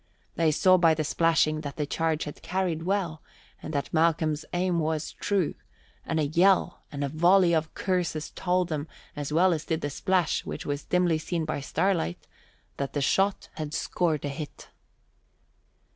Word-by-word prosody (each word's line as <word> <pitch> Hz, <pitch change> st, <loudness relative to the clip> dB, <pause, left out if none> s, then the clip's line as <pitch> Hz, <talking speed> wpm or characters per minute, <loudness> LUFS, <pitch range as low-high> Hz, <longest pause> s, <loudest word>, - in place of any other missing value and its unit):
They 165 Hz, -1 st, +3 dB
saw 185 Hz, +4 st, +5 dB
by 165 Hz, -3 st, +4 dB
the 155 Hz, -, -1 dB
splashing 155 Hz, -1 st, +2 dB
that 145 Hz, -2 st, -6 dB
the 150 Hz, -, -1 dB
charge 160 Hz, +1 st, -1 dB
had 150 Hz, -, -8 dB
carried 180 Hz, -3 st, -1 dB
well 175 Hz, -3 st, -1 dB, 0.4 s
and -, -, -6 dB
that 140 Hz, -, -2 dB
Malcolm's 160 Hz, -2 st, +2 dB
aim 180 Hz, -1 st, +1 dB
was 155 Hz, -1 st, -1 dB
true, 195 Hz, -6 st, 0 dB, 0.5 s
and 160 Hz, -, 0 dB
a 155 Hz, -, +2 dB
yell 180 Hz, +4 st, +3 dB
and 145 Hz, -1 st, -3 dB
a -, -, 0 dB
volley 175 Hz, +4 st, +4 dB
of 160 Hz, -1 st, 0 dB
curses 175 Hz, -5 st, -1 dB
told 180 Hz, -1 st, 0 dB
them 150 Hz, -1 st, -3 dB, 0.3 s
as 145 Hz, -1 st, -4 dB
well 175 Hz, +4 st, +4 dB
as 155 Hz, -1 st, -3 dB
did 160 Hz, -1 st, -1 dB
the 145 Hz, -, -2 dB
splash, 185 Hz, +1 st, +1 dB
which -, -, -6 dB
was 145 Hz, 0 st, -3 dB
dimly 180 Hz, -3 st, +2 dB
seen 165 Hz, 0 st, -2 dB
by 155 Hz, -2 st, -3 dB
starlight, 165 Hz, -, -1 dB, 0.5 s
that 140 Hz, -1 st, -3 dB
the 145 Hz, -, 0 dB
shot 195 Hz, +8 st, +1 dB
had 155 Hz, -1 st, -4 dB
scored 160 Hz, -5 st, 0 dB
a -, -, -1 dB
hit. 145 Hz, +1 st, -8 dB
160 Hz, 175 wpm, -27 LUFS, 150-180 Hz, 0.5 s, saw